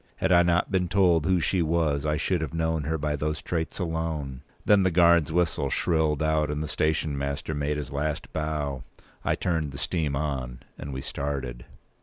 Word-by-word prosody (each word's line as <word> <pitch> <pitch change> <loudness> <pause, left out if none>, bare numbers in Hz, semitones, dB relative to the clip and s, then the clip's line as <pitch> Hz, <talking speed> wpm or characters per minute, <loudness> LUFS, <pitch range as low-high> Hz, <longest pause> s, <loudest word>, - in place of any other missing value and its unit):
Had 95 - 0
I 85 -1 +7
not 85 +1 +2
been 90 -2 +1
told 90 -5 +3
who 95 -1 +3
she 90 +2 +1
was, 80 -3 +1
I 75 0 +1
should 90 +2 0
have 80 0 -4
known 80 -2 0
her 80 +2 0
by 75 0 -1
those 75 +1 -2
traits 80 -2 -3
alone. 80 -6 -3 0.2
Then 105 -1 +5
the 95 - +3
guard's 85 -3 +4
whistle 85 -4 +1
shrilled 80 -1 +1
out, 80 -1 +1
and 75 +1 -2
the - - -4
station 75 -1 0
master 70 +2 -3
made 75 0 -1
his 75 -3 -5
last 75 +1 -3
bow; 75 -4 -2 0.4
I - - +1
turned 80 -5 -1
the 65 - -8
steam 75 -2 -1
on; 65 -4 -3
and 70 - -7
we 65 0 -4
started. 70 -4 -4
75 Hz, 195 wpm, -26 LUFS, 70-85 Hz, 0.4 s, I